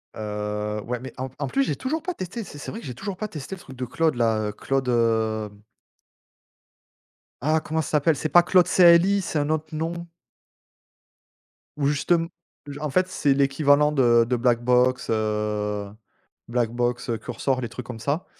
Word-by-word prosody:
Heu, 105 0 -3
ouais, 120 0 -3
mais 130 +1 -9
en 130 +1 -4
en 140 - -2
plus, 275 - +1
j'ai - - -1
toujours 305 +5 -3
pas 360 - -3
testé 220 - -6
c'est 160 - -11
c'est 145 - -7
vrai 225 - -7
que - - -11
j'ai 125 - -6
toujours 195 - -5
pas 215 +3 -4
testé 155 +3 -7
le 185 - -15
truc 135 - -12
de 125 - -3
Claude 160 +4 0
là, 110 -3 +1
heu, - - -3
Claude, 135 +4 -2
hem 110 -3 0 1.8
ah 155 +2 +3
comment 160 +1 -2
ça - - -5
s'appelle? 155 +1 +3
C'est 155 - -3
pas 175 +2 +6
Claude 180 0 +4
CLI? 180 +3 +5
C'est 165 -4 -2
un 145 +1 -1
autre 155 0 -2
nom. 165 +2 -2 1.8
Où 140 -2 +1
justem 165 +3 +1 0.4
j 145 0 -7
en 150 0 -3
fait, 185 +7 +2
c'est 150 -6 +1
l'équivalent 145 +2 +3
de 120 -5 +4
de 125 - +1
Blackbox, 125 +1 +2
heu, 105 -2 -1 0.6
Blackbox, 120 +1 -1
heu, 115 - 0
Cursor 130 +3 -2
les 120 - -4
trucs 120 +1 -8
comme 120 -2 -7
ça, 145 +9 -2
135 Hz, 185 wpm, -24 LUFS, 115-160 Hz, 1.8 s, pas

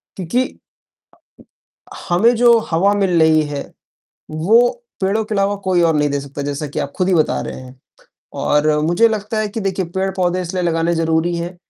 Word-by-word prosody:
क्योंकि 195 +8 -1 1.7
हमें 215 +8 +3
जो 235 0 +5
हवा 195 +5 +2
मिल 190 -4 +1
रही 155 -1 +4
है, 145 -1 -4 0.7
वो 215 +11 +3 0.3
पेड़ों 200 +3 0
के 215 - -5
अलावा 200 +1 +1
कोई 175 -2 +3
और 165 -2 +3
नहीं 150 0 +2
दे 140 0 -1
सकता, 140 +1 -7
जैसा 145 +1 -4
कि - - -6
आप 140 - -4
खुद 185 0 0
ही 185 - +3
बता 155 -3 +1
रहे - - -6
हैं। 130 0 -13 0.6
और 150 +1 +2 0.2
मुझे 230 +7 +4
लगता 215 0 -3
है 215 -1 -1
कि 220 +2 -5
देखिए, 190 -1 -2
पेड़-पौधे 185 -1 -1
इसलिए 180 +1 -3
लगाने 165 0 0
ज़रूरी 165 +1 0
हैं, 175 +1 -5
180 Hz, 180 wpm, -18 LUFS, 160-200 Hz, 1.7 s, जो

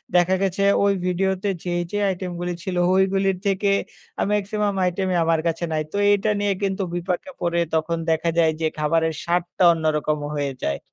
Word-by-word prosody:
দেখা 180 +1 +4
গেছে 195 0 0 0.2
ওই 200 0 +4
ভিডিওতে 190 +2 0
যেই 175 -1 -1
যে, 205 - -2 0.2
item 180 0 -5
গুলি 175 0 -2
ছিল 190 -3 -3 0.2
ওইগুলির 195 0 +2
থেকে 200 +1 +1 0.5
আ - - +3
maximum 205 0 0
item 190 +2 -1
ই - - +2
আমার 165 -1 +2
কাছে 165 +1 -2
নাই। 155 -1 0
তো - - -3
এইটা 205 +1 +2
নিয়ে 205 -1 +1
কিন্তু 195 0 0
বিপাকে 180 +8 -3
পড়ে 170 0 0
তখন 160 +1 0
দেখা 160 +1 +1
যায় 160 -1 +4
যে, 160 - +2
খাবারের 160 +1 +1
স্বাদটা 175 +1 0
অন্যরকম 155 -1 0 0.2
হয়ে 140 -2 -2
যায়। 70 0 -1
180 Hz, 180 wpm, -23 LUFS, 165-195 Hz, 0.5 s, দেখা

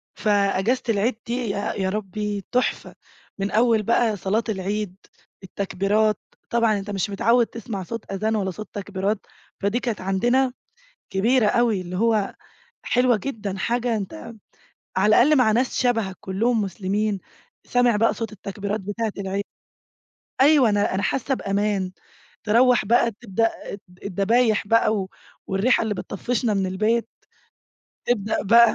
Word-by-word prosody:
فأجازة 205 +3 +1
العيد 225 +3 +1
دي 235 - -2 0.2
يا 200 +1 -2
يا 190 -1 -1
ربي 205 0 -3
تحفة، 250 +1 -1 0.4
من 195 +1 -1
أول 225 -1 +3
بقى 230 0 +2
صلاة 205 +4 0
العيد، 200 -1 -2 0.5
التكبيرات، 200 +3 0 0.3
طبعًا 230 -3 +2
أنت 195 +1 -8
مش 195 -1 -1
متعود 230 +4 +3
تسمع 220 -4 -6
صوت 230 +4 -7
آذان 215 +3 0
ولا 195 -3 -1
صوت 215 +4 -8
تكبيرات 200 +1 -2 0.3
فدي 200 +4 0
كانت 235 -6 -3
عندنا 240 +8 +1 0.6
كبيرة 225 +5 +3
أوي 230 -4 +2
اللي 180 0 -6
هو 220 -1 +1 0.5
حلوة 250 -1 +3
جدًا، 210 -5 -4
حاجة 240 +2 0
أنت 230 +5 -6 0.6
على 190 +3 +3
الأقل 300 +5 +5
مع 220 -4 +4
ناس 245 +3 0
شبهك 225 -7 0
كلهم 220 +4 0
مسلمين، 200 +1 -1 0.4
سامع 245 -2 +3
بقى 225 +2 +3
صوت 225 -1 -5
التكبيرات 200 +1 -4
بتاعة 205 +2 -3
العيد. 195 +1 -2 1.0
أيوه 280 -4 +6
أنا 205 -2 +1
أنا 195 - -1
حاسة 270 +1 0
بأمان. 200 -3 -1 0.5
تروّح 240 +2 +4
بقى 235 +2 +3
تبدأ 225 0 +1 0.2
الد 185 -3 -13
الدبايح 205 +3 +2
بقى 225 0 +3
و 190 -2 -3 0.4
والريحة 205 +6 +2
اللي 220 -2 -1
بتطفِّشنا 220 +4 -2
من 195 -1 +1
البيت 215 +5 0 1.0
تبدأ 215 -3 0
بقى. 230 +2 +6
210 Hz, 140 wpm, -23 LUFS, 195-235 Hz, 1.0 s, أيوه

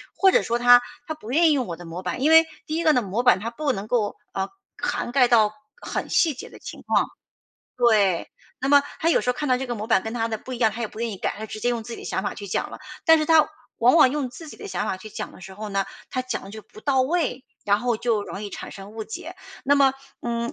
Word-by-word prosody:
或 385 -1 +5
者 - - +4
说 235 0 -1
他 245 0 +7 0.2
他 315 - -3
不 245 -6 -9
愿 325 +3 +5
意 - - +4
用 265 -4 +1
我 170 - -4
的 175 +1 -11
模 170 +2 -6
板。 185 +7 -4
因 305 +3 +4
为 325 0 +8 0.2
第 310 - -3
一 335 - -1
个 310 -2 +5
呢， 250 - +3
模 210 +4 -2
板， 245 -7 +5
它 225 +3 -3
不 280 +2 -1
能 200 +1 -5
够， 220 -3 0 0.2
呃 190 0 -2 0.3
涵 240 - -2
盖 255 -2 +5
到 215 -3 +4 0.3
很 - - -4
细 320 -4 +3
节 255 - -9
的 - - -14
情 - - -9
况。 - - +2 0.7
对， 210 -7 +3 0.3
那 270 - -1
么 285 0 +6 0.2
他 330 - +2
有 - - +4
时 - - -5
候 - - +4
看 295 +2 -3
到 255 - +4
这 265 - -4
个 240 - -3
模 215 0 -5
板 195 - +4
跟 220 +2 -5
他 230 -1 0
的 220 -1 -3
不 255 - -9
一 240 - -4
样， 225 -3 +4
他 235 - -7
也 220 - -2
不 220 - -10
愿 235 -1 -1
意 200 - -6
改， - - -2
他 - - -10
就 220 - -4
直 215 - -7
接 240 - +1
用 235 -2 -1
自 235 +1 -8
己 - - -7
的 - - -9
想 190 - -2
法 - - -3
去 200 - -8
讲 185 - -2
了。 - - -8 0.3
但 325 0 +7
是 310 - 0
他 315 -2 +5 0.3
往 245 +5 +5
往 260 - +7
用 280 -4 -2
自 315 +5 -10
己 - - -10
的 - - -8
想 185 - -2
法 185 - -1
去 215 +3 -11
讲 210 +1 -6
的 - - -15
时 190 +2 -10
候 215 +1 -6
呢， 195 -1 0 0.2
他 255 - -2
讲 255 - -4
得 195 - -10
就 215 0 -9
不 215 +1 -15
到 270 -2 +2
位， 280 -3 -1 0.2
然 205 0 +3
后 240 -2 +1
就 220 -3 0
容 200 - -7
易 - - -4
产 - - -8
生 195 +1 -10
误 220 0 -5
解。 220 - -7 0.3
那 285 +2 +4
么， 275 -2 +5 0.3
嗯， 235 0 -2
235 Hz, 320 characters per minute, -24 LUFS, 210-270 Hz, 0.7 s, 为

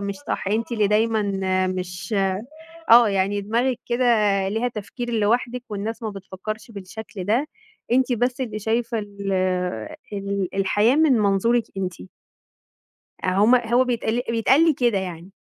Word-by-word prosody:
مش 200 0 -3
صح. 290 - -4
أنتِ 225 +3 -1
اللي 215 -3 +2
دايمًا 220 +1 +2 0.4
مش 180 +1 -4 0.8
آه 235 -1 +8
يعني 200 +1 0
دماغكِ 235 +5 0
كده 245 +1 0 0.4
ليها 225 +4 0
تفكير 240 +2 -6
لوحدِك 235 +3 0
والناس 215 +3 -4
ما 220 - -2
بتفكّرش 200 +3 -7
بالشكل 200 -1 -8
ده. 240 +9 +1 0.5
أنتِ 260 0 +3
بس 245 +2 0
اللي 220 -4 -3
شايفة 230 +2 -1
ال 205 -1 -8 0.9
ال 200 -2 -2
الحياة 205 +6 +2
من 315 -3 +4
منظورِك 220 +2 +2
أنتِ. 185 - -4 1.2
آه، - - -1
هُم 210 +7 +4
هو 240 +1 +3
بيتق 235 -1 -1
بيتقال 260 +8 +4
لي 320 - +4
كده 240 -5 +1
يعني. 180 -1 -6
220 Hz, 140 wpm, -23 LUFS, 200-240 Hz, 1.2 s, آه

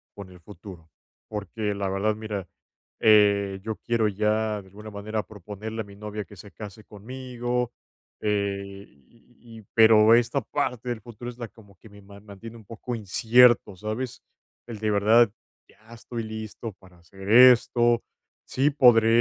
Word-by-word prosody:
con 100 -2 -10
el 90 -1 -15
futuro, 90 -3 -13 0.4
porque 105 0 -4
la 100 -1 -3
verdad, 100 +3 0
mira, 105 -3 -5 0.5
eh, 100 -2 +4
yo 110 0 -4
quiero 115 -2 0
ya 105 +1 -1
de 95 - -19
alguna 105 +3 -11
manera 105 +1 -4
proponerle 105 +3 -8
a - - -7
mi 100 0 -14
novia 105 0 -6
que 105 - -15
se 100 +3 -13
case 105 0 -10
conmigo. 125 +2 -4 0.5
Eh, 100 -1 -2
y 115 - -18
pero, 110 -1 +7
esta 120 +3 +1
parte 125 -4 -3
del 120 -2 -3
futuro 120 +2 -9
es 120 - -17
la 120 - -5
como 100 -3 -20
que - - -17
me 100 0 -16
mantiene 100 +3 -12
un 110 - -16
poco 115 +3 -6
incierto, 115 +1 +3
¿sabes? 110 +5 -5 0.5
¿El 115 -3 -8
de 110 0 -1
verdad 110 +2 +4 0.4
ya 110 +2 -18
estoy 115 0 -7
listo 110 0 -7
para 90 -2 -21
hacer 95 +3 -11
esto?, 120 -1 +6 0.4
sí 140 +3 +1
podré 120 -5 +5
110 Hz, 155 wpm, -25 LUFS, 100-115 Hz, 0.5 s, pero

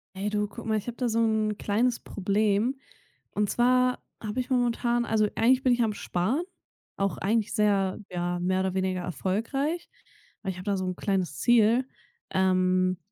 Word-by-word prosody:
Hey, 200 +2 -2
du, 210 0 0
guck 200 - -10
mal, 220 -1 +1
ich 210 - -5
habe 240 - -5
da 250 - 0
so 230 0 0
'n 220 -2 +1
kleines 235 +4 0
Problem. 205 +5 0 0.6
Und 210 -1 0
zwar 250 +1 +2 0.2
habe 215 +3 -2
ich 250 - -8
momentan 240 -1 +1
also, 220 -2 +2
eigentlich 255 +3 +3
bin 255 - +4
ich 240 - +1
am 215 -2 0
Sparen 215 - -1 0.5
auch 195 0 0
eigentlich 215 +2 0
sehr, 200 -3 +2
ja, 175 0 -2
mehr 185 +1 +1
oder 190 -1 0
weniger 185 -1 0
erfolgreich, 230 - -2 0.5
weil 195 - -2
ich 180 - -9
habe 185 - -8
da 200 - +1
so 185 - -2
'n 185 0 -2
kleines 185 -8 -1
Ziel, 240 - +4 0.4
ähm. 185 -1 +2
210 Hz, 180 wpm, -27 LUFS, 190-240 Hz, 0.6 s, bin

